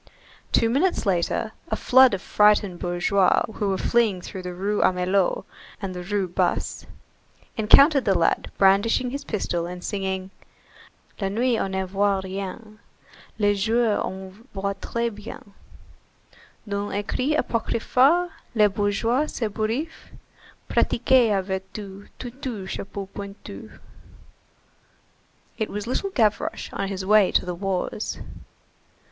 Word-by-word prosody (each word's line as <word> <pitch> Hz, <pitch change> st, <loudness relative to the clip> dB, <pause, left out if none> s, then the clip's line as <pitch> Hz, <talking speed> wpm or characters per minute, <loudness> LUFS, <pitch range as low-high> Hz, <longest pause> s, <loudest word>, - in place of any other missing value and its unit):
Two 230 Hz, -, +3 dB
minutes 285 Hz, +9 st, +1 dB
later, 195 Hz, +3 st, 0 dB, 0.2 s
a -, -, -1 dB
flood 260 Hz, -3 st, +5 dB
of 190 Hz, -, -8 dB
frightened 210 Hz, -3 st, +3 dB
bourgeois 180 Hz, +2 st, +2 dB
who 205 Hz, -1 st, -1 dB
were 190 Hz, -, 0 dB
fleeing 225 Hz, -3 st, +2 dB
through 185 Hz, +1 st, -7 dB
the 180 Hz, -1 st, -6 dB
Rue 205 Hz, +3 st, -1 dB
Amelot 185 Hz, +1 st, +1 dB, 0.3 s
and 195 Hz, -3 st, -4 dB
the 180 Hz, -, -6 dB
Rue 195 Hz, +1 st, -1 dB
Basse, 175 Hz, -, -1 dB, 0.7 s
encountered 275 Hz, +6 st, +6 dB
the 195 Hz, -2 st, +3 dB
lad 165 Hz, -, +1 dB
brandishing 200 Hz, +6 st, +3 dB
his 280 Hz, +2 st, -5 dB
pistol 175 Hz, -5 st, -2 dB
and 180 Hz, 0 st, -8 dB
singing:— 190 Hz, -2 st, -3 dB, 0.9 s
La 195 Hz, -2 st, -1 dB
nuit 235 Hz, +3 st, +1 dB
on 195 Hz, -, -1 dB
ne 190 Hz, 0 st, 0 dB
voit 195 Hz, +1 st, 0 dB
rien, 200 Hz, +3 st, -7 dB, 0.6 s
Le 205 Hz, -1 st, +3 dB
jour 220 Hz, +2 st, +1 dB
on 190 Hz, +5 st, -8 dB
voit 200 Hz, +1 st, -1 dB
très 235 Hz, -1 st, -2 dB
bien, 210 Hz, +2 st, -9 dB, 1.2 s
D'un 200 Hz, 0 st, -2 dB
écrit 255 Hz, +8 st, -1 dB
apocryphe 265 Hz, +9 st, +2 dB, 0.2 s
Le 210 Hz, -2 st, +5 dB
bourgeois 215 Hz, +8 st, 0 dB
s'ébouriffe, 225 Hz, +8 st, -3 dB, 0.6 s
Pratiquez 250 Hz, -1 st, +3 dB
la 195 Hz, -2 st, +1 dB
vertu, 190 Hz, +1 st, -6 dB
Tutu, 245 Hz, -5 st, -6 dB
chapeau 195 Hz, +1 st, -5 dB
pointu!44 200 Hz, 0 st, -9 dB, 1.8 s
It 220 Hz, -, -1 dB
was 210 Hz, 0 st, -4 dB
little 260 Hz, +11 st, -1 dB
Gavroche 220 Hz, -, 0 dB
on 195 Hz, -, -2 dB
his 190 Hz, -1 st, -4 dB
way 210 Hz, -1 st, +5 dB
to -, -, +2 dB
the 180 Hz, -, -3 dB
wars. 195 Hz, +3 st, -3 dB
205 Hz, 125 wpm, -24 LUFS, 190-230 Hz, 1.8 s, encountered